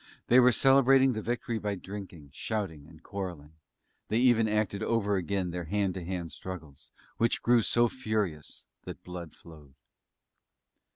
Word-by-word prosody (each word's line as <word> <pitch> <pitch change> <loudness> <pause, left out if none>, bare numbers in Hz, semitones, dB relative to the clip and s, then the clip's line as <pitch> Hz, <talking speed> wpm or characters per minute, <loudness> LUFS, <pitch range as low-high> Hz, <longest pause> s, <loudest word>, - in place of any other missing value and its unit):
They 125 - +7
were 125 0 +6
celebrating 135 0 +5
the 110 - -3
victory 115 0 -2
by 105 -1 -2
drinking, 95 -7 -9
shouting 90 -10 -4
and 80 0 -17
quarrelling; 85 -7 -6 0.5
they 110 - 0
even 120 -2 +4
acted 105 -2 0
over 105 -3 +1
again 95 0 -1
their 90 0 -4
hand 100 +2 0
to 95 -1 -6
hand 85 -2 -4
struggles, 80 -6 -9 0.3
which 115 +1 +1
grew 120 0 +4
so 120 +5 +3
furious 110 - -3 0.2
that - - -8
blood 90 -3 -8
flowed. 75 -5 -16
100 Hz, 150 wpm, -29 LUFS, 85-115 Hz, 0.5 s, They